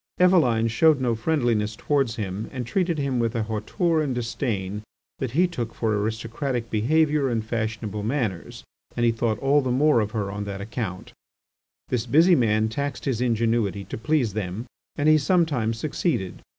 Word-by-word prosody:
Eveline 135 -12 +4
showed 150 +6 +4
no 125 -2 +1
friendliness 115 -4 0
towards 135 -3 0
him, 100 -1 -4
and 125 -2 -4
treated 175 - 0
him 140 -3 -1
with 115 -1 0
a 115 - 0
hauteur 110 - 0
and 135 -4 -1
disdain 105 -5 -3 0.4
that 130 -3 -3
he 180 - +5
took 120 -10 -4
for 110 -2 0
aristocratic 115 +3 -3
behaviour 145 +5 +2
and 115 -2 -1
fashionable 110 -2 -3
manners, 110 -6 -3 0.3
and 120 - +2
he 115 - +4
thought 115 -1 -1
all 140 +4 +3
the 130 - -2
more 140 +1 +4
of 105 -2 0
her 105 -3 -3
on 105 +1 -4
that 100 -1 -5
account. 100 -3 -5 0.8
This 120 -3 -1
busy 165 +5 +5
man 110 -6 +3
taxed 140 +5 -4
his 125 -4 -1
ingenuity 115 -4 +1
to 95 - -7
please 120 -3 +1
them, 105 +2 -4 0.3
and 145 0 0
he 155 0 +6
sometimes 140 -8 +1
succeeded. 140 - -2
115 Hz, 170 wpm, -24 LUFS, 110-140 Hz, 0.8 s, he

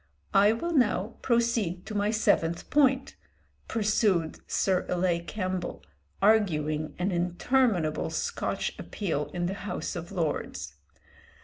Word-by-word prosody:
"I 200 +1 +6
will 340 +10 -2
now 220 - +1
proceed 230 -7 +1
to 220 - -6
my 205 0 +1
seventh 175 -6 +1
point," 270 -2 +3 0.5
pursued 205 -7 +1
Sir 185 -2 +1
Ilay 175 -1 0
Campbell, 185 -3 -3 0.4
arguing 155 -8 +2
an 180 +3 0
interminable 180 0 +1
Scotch - - -2
appeal 160 -8 -2
in 175 -1 -3
the 185 - -1
House 200 0 -4
of 170 +1 -6
Lords. 150 - -3
190 Hz, 115 wpm, -28 LUFS, 170-220 Hz, 0.5 s, I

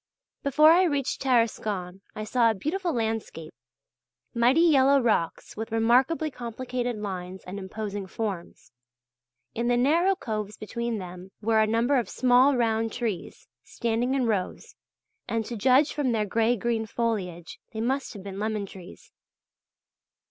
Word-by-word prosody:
Before 305 +3 +5
I 360 +3 +5
reached 285 -5 -1
Tarascon 215 -7 0
I 215 - -4
saw 230 +2 +3
a 220 - 0
beautiful 345 - -2
landscape: 220 - -3 0.8
mighty 245 +7 +4
yellow 280 -4 +5
rocks 215 -9 -1
with 220 +1 -5
remarkably 255 +8 +2
complicated 245 0 -4
lines 190 -3 -6
and 190 +2 -6
imposing 200 0 -5
forms; 195 - -5 0.8
in 235 +1 -2
the 245 0 +3
narrow 335 +10 +3
coves 215 - -5
between 235 +1 -3
them 180 -1 -8
there 215 - -12
were 220 -1 +4
a 215 - +3
number 235 +5 +2
of 230 - -4
small 255 +2 +4
round 225 -1 +1
trees 225 -7 -4 0.2
standing 235 +3 -1
in 260 -2 +1
rows, 205 -5 -2 0.5
and 225 -1 -1
to 235 - -5
judge 260 +7 +3
from 275 -5 0
their 215 -2 +1
grey 225 +4 +2
green 225 0 -1
foliage 195 -8 -3
they 220 - -6
must 265 +5 -1
have 200 -3 -9
been 195 -1 -7
lemon 215 -1 -2
trees. 185 -1 -13
230 Hz, 150 wpm, -26 LUFS, 210-255 Hz, 0.8 s, Before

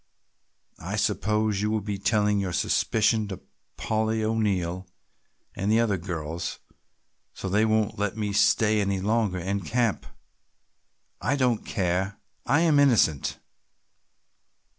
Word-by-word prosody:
I - - -4
suppose 105 -1 0
you 105 - 0
will 110 0 0
be 100 -1 -4
telling 105 -1 +2
your 95 -3 -2
suspicion 110 +3 +1
to 95 -2 -6 0.4
Polly 110 0 -1
O'Neill 95 -5 -1 0.7
and 100 +2 -1
the 110 - +4
other 110 -4 +1
girls 85 -2 -4 0.8
so - - -5
they 105 +4 +2
won't 110 -2 0
let 105 0 -1
me 105 -2 -2
stay 105 +1 +3
any 100 -1 0
longer 105 -1 0
in 95 +3 -2
camp. 115 +4 -1 1.1
I 135 - +1
don't 125 -5 +1
care, 95 0 -1 0.3
I 145 +3 +3
am 160 -4 +4
innocent!" 115 - +3
105 Hz, 125 wpm, -26 LUFS, 95-110 Hz, 1.1 s, the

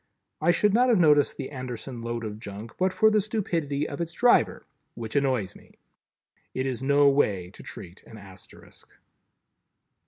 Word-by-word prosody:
I 160 - +2
should 200 +4 +3
not 250 +3 +4
have 235 - +4
noticed 150 -5 +4
the - - -6
Anderson 125 -2 -6
load 115 0 -4
of 105 -1 -6
junk, 105 +2 -8
but 185 +1 +2
for 220 +4 +4
the 215 -1 +3
stupidity 165 -9 -2
of 145 - -6
its 170 0 -4
driver, 240 +6 +3 0.3
which 110 -2 -7
annoys 130 -9 0
me. - - -18 0.8
It 130 - -1
is 130 -3 -3
no 140 +1 +4
way 100 -10 +1
to - - -13
treat 90 +2 -10
an 110 - -12
Asterisk. 95 -2 -14
140 Hz, 165 wpm, -26 LUFS, 115-170 Hz, 0.8 s, not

